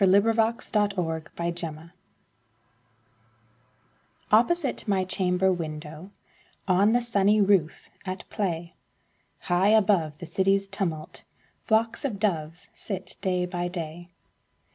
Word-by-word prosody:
Louisa 200 +4 +5
May 225 -1 +1
Alcott 170 -6 -2
My 170 0 -1
Doves 165 -1 -5 2.4
OPPOSITE 265 +6 +2
my 190 -2 +1
chamber 185 0 +2
window, 155 +1 -6 0.6
On 200 +4 +4
the 245 - +3
sunny 210 -3 +2
roof, 195 -6 +2
at 185 -1 -6
play, 170 -5 -2 0.7
High 180 +3 +2
above 195 -8 +3
the 175 - -8
city's 195 +3 +1
tumult, 165 -6 -3 0.4
Flocks 225 +4 +1
of 250 -8 -2
doves 170 -5 -2
sit 190 -3 -6
day 180 -2 0
by 175 0 -3
day. 175 -1 -6
185 Hz, 110 wpm, -26 LUFS, 170-205 Hz, 2.4 s, Louisa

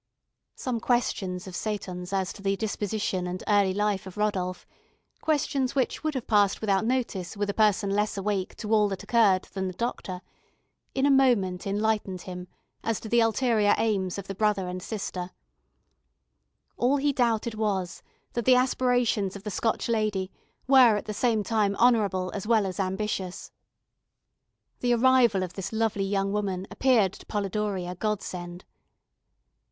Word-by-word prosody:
Some 250 -3 -3
questions 200 -7 -1
of 185 -2 -8
Seyton's 185 -4 -4
as 190 -1 -1
to 200 - -12
the 195 0 +1
disposition 205 -3 -2
and 180 0 -5
early 205 -2 +4
life 205 -1 -1
of 190 - -10
Rodolph, 190 -4 -1 0.6
questions 280 -4 0
which 265 +2 0
would 310 -2 -1
have 255 - -3
passed 205 -3 +3
without 200 -2 +1
notice 225 -7 -2
with 205 0 0
a - - -11
person 205 -2 +2
less 210 +1 0
awake 195 -1 -2
to 215 0 -3
all 210 -1 +5
that 195 - -5
occurred 205 -6 +3
than 190 -1 -2
the 185 - -6
doctor, 190 -5 -4 0.7
in 270 0 +2
a 285 - +4
moment 215 -10 +2
enlightened 205 -2 -1
him 180 -1 -7 0.4
as 225 -2 -1
to 220 - -7
the 235 - +4
ulterior 225 -2 +3
aims 195 -5 0
of 200 - -6
the 195 - -5
brother 200 -2 +1
and 180 0 -5
sister; 185 -3 -4 1.5
all 255 +4 +2
he 285 +1 +1
doubted 235 -3 +1
was, 200 -4 -2 0.3
that 235 -2 -2
the 255 - +6
aspirations 245 -6 +1
of 200 - -9
the 210 - -4
Scotch 225 +4 -1
lady 215 -5 0 0.3
were 255 -5 +6
at - - -5
the 215 - -4
same 220 -1 +1
time 210 -2 +1
honourable 205 -7 +2
as 205 0 -5
well 220 -3 +3
as 190 +1 -5
ambitious. 190 -1 -3 1.3
The 245 -1 +2
arrival 240 -5 +4
of 180 -1 -5
this 195 0 -5
lovely 220 -3 0
young 195 0 0
woman 195 -3 -2
appeared 230 -8 +3
to - - -13
Polidori 205 -2 -2
a 180 - -4
godsend. 180 -3 -4
205 Hz, 160 wpm, -27 LUFS, 190-230 Hz, 1.5 s, the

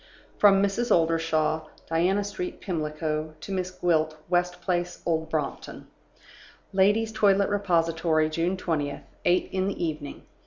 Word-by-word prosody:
From 200 -1 +6
Mrs. 200 +5 0
Oldershaw 160 -2 +2 0.2
(Diana 180 +5 +2
Street, 200 -3 -5
Pimlico) 155 -3 -3
to 195 - -8
Miss 185 -1 -1
Gwilt 160 -4 0
(West 180 0 +1
Place, 175 -1 -2
Old 160 -2 0
Brompton). 155 -3 -4 0.9
"Ladies' 205 +4 +3
Toilet 200 -2 +3
Repository, 165 -5 +1
June 170 +4 -1
20th, 150 -6 -2 0.2
"Eight 175 +1 +3
in 190 0 0
the 195 -3 -2
Evening. 150 -3 -5
175 Hz, 125 wpm, -26 LUFS, 160-190 Hz, 0.9 s, From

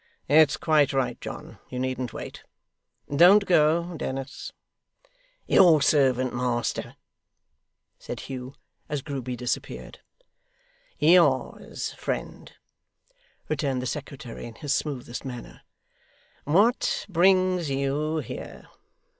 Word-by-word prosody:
It's 150 0 +5
quite 150 -3 +2
right, 135 -2 -1
John, - - -8
you 125 - -6
needn't 130 -1 -2
wait. - - -8 0.7
Don't 190 +6 +7
go, 170 0 +2
Dennis.' 135 +2 -5 0.9
'Your 170 -5 +6
servant, 130 -3 +2
master,' 120 -1 -2 1.0
said - - -7
Hugh, 130 0 -7 0.3
as 145 -3 -3
Grueby 130 -4 -4
disappeared. 125 +1 -5 1.0
'Yours, 155 -5 +2
friend,' - - -5 0.9
returned 135 -5 -1
the 125 - -4
secretary 135 -4 -6
in 115 - -11
his 145 +2 -2
smoothest 130 -6 -3
manner. 125 -3 -8 0.8
'What 205 - +2
brings 185 -2 +3
YOU 140 +3 -1
here? 150 - -7
140 Hz, 95 wpm, -26 LUFS, 130-160 Hz, 1.0 s, Don't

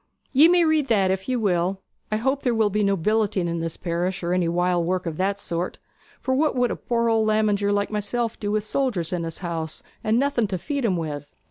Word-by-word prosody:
'Ye 290 +5 +8
may 350 0 +4
read 310 -3 +2
that 195 -5 +3
if 190 +4 -3
ye 255 - +1
will. 190 -3 0 0.3
I 215 - +2
hope 265 +5 0
there 245 -3 +1
will 220 -2 +2
be 210 +1 +1
no 200 -1 +2
billeting 205 0 +1
in 170 0 -2
this 165 -1 -3
parish, 175 +2 -2
or 170 +1 0
any 180 -2 +1
wild 175 0 +1
work 185 0 -1
of 160 -2 -4
that 195 +1 0
sort; 175 -2 -4 0.4
for 260 - -1
what 295 +2 +2
would 245 -1 +2
a - - -1
poor 235 -1 -1
old 225 -1 +2
lamiger 210 -2 +2
like 205 +1 0
myself 220 +2 -2
do 205 - -3
with 215 0 0
soldiers 215 - -1
in 175 -2 -1
his 165 -1 -5
house, 160 -2 -4 0.2
and 215 +1 +2
nothing 255 -4 +1
to 190 -2 -2
feed 280 - -2
'em 185 -4 +1
with?' 145 -3 -5
205 Hz, 235 wpm, -24 LUFS, 175-235 Hz, 0.4 s, Ye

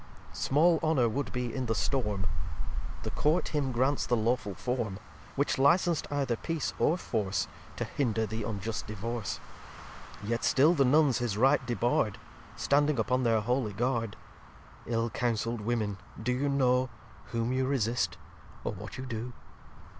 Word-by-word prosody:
xxx - - -11
Small 160 +4 +4
Honour 155 -7 +3
would 140 +5 -2
be 125 -2 -2
in 130 -2 -2
the 110 - +1
Storm. 105 -8 0 0.8
The - - -3
Court 155 +4 +1
him 145 -4 0
grants 130 +4 +1
the 120 - +2
lawful 115 -2 0
Form; 115 -3 -2 0.4
Which 140 0 +1
licens'd 170 +3 +4
either 140 -4 0
Peace 165 +4 -2
or 165 - +3
Force, 105 - -1 0.3
To - - -2
hinder 115 -5 0
the 110 +2 -4
unjust 105 0 -3
Divorce. 110 +1 -3 0.8
Yet 115 +3 -1
still 150 +6 +5
the 140 -5 +3
Nuns 140 -1 +4
his 120 -4 -1
Right 135 +5 +4
debar'd, 115 -3 +1 0.4
Standing 145 0 +2
upon 125 +3 +1
their 115 -3 +3
holy 120 -1 0
Guard. 115 -1 0 0.7
Ill 115 -1 0
counsell'd 115 0 -1
Women, 105 -3 -1 0.2
do 115 +3 -1
you 140 +3 0
know 130 -2 +3 0.4
Whom 115 +1 -1
you 130 0 +1
resist, 115 -10 0 0.5
or - - -1
what 105 +2 -8
you 130 - -5
do? 120 0 -4
120 Hz, 155 wpm, -30 LUFS, 110-135 Hz, 0.8 s, still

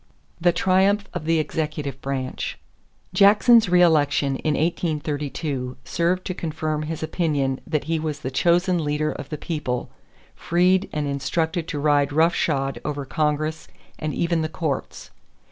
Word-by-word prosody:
=The 175 +1 +4
Triumph 190 +3 +2
of 155 - -5
the 165 0 +2
Executive 150 -3 -3
Branch.= 135 -2 -3 0.6
Jackson's 215 +3 +6
reëlection 160 -6 +4
in 155 -2 0
1832 150 -5 -2
served 175 +2 0
to 185 - -2
confirm 155 -2 -3
his 160 +1 -4
opinion 145 -5 -1
that 155 -2 -1
he 160 +2 -1
was 155 -2 -4
the 130 - -4
chosen 175 +4 +2
leader 150 +1 0
of 145 -1 -7
the 150 - -4
people, 145 -6 -3 0.4
freed 185 +3 +2
and 150 -1 -2
instructed 160 +4 -1
to 150 - -3
ride 145 -1 +2
rough 160 +4 +3
shod 135 -3 -1
over 145 -1 -3
Congress 155 +2 -1 0.3
and 155 -1 -2
even 170 -1 +1
the 155 - -2
courts. 155 -4 -4
155 Hz, 145 wpm, -23 LUFS, 145-170 Hz, 0.6 s, Jackson's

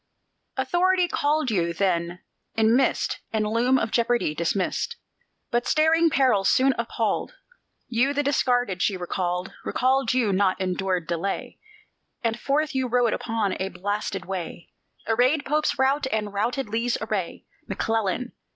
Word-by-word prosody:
Authority 355 +7 +2
called 295 -4 0
you; 170 -4 0
then, 175 -1 -1 0.3
in 225 +1 +4
mist 265 +1 +1
And 215 -1 0
loom 235 +5 +2
of 225 - -1
jeopardy 235 -8 +1
dismissed. 185 - -1 0.6
But 240 0 0
staring 325 +2 +4
peril 255 -9 +3
soon 260 +7 +4
appalled; - - -1 0.5
You, 245 +4 +2
the 290 +1 0
Discarded, 245 -8 +1
she 195 - +1
recalled 180 0 -3
Recalled 260 -1 +1
you, 225 -6 +2
nor 190 -1 +2
endured 185 -1 -1
delay; 170 +4 -3 0.6
And 230 0 0
forth 295 +2 0
you 260 -1 0
rode 245 -1 +2
upon 220 -4 -1
a 190 - -2
blasted 195 +1 -3
way, 180 -3 -6 0.3
Arrayed 255 +7 +2
Pope's 300 +2 0
rout, 270 +1 +2
and 210 -2 -2
routed 235 +5 -1
Lee's 230 +3 0
array, 210 -6 -3 0.2
McClellan! 225 +2 -1
225 Hz, 135 wpm, -25 LUFS, 190-265 Hz, 0.6 s, in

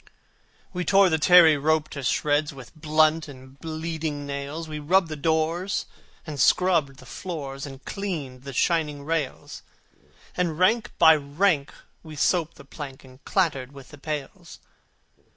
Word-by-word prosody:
We 180 0 -2
tore 195 0 +5
the 160 -2 +1
tarry 165 -2 +7
rope 155 +1 +1
to 140 - -7
shreds 145 +4 +1
With 135 -4 -12
blunt 155 +1 +2
and 130 -1 -13
bleeding 160 -2 -4
nails; 140 +3 -5
We 155 -1 -6
rubbed 170 +4 +2
the 155 - -4
doors, 160 +5 0 0.4
and 150 -3 -6
scrubbed 165 -7 +3
the - - -14
floors, 145 -6 -6
And 135 -1 -12
cleaned 155 -11 -5
the 140 +1 -8
shining 150 0 0
rails: 160 -4 -3 0.7
And, 170 -4 -1
rank 220 +6 +2
by 160 -1 +7
rank, 145 +1 0 0.3
we 155 -1 -11
soaped 165 +3 +1
the 140 - -14
plank, 140 -2 -9
And 130 0 -17
clattered 145 -8 0
with 135 -2 -13
the 145 - -13
pails. 150 -1 -6
155 Hz, 150 wpm, -25 LUFS, 140-165 Hz, 0.7 s, tarry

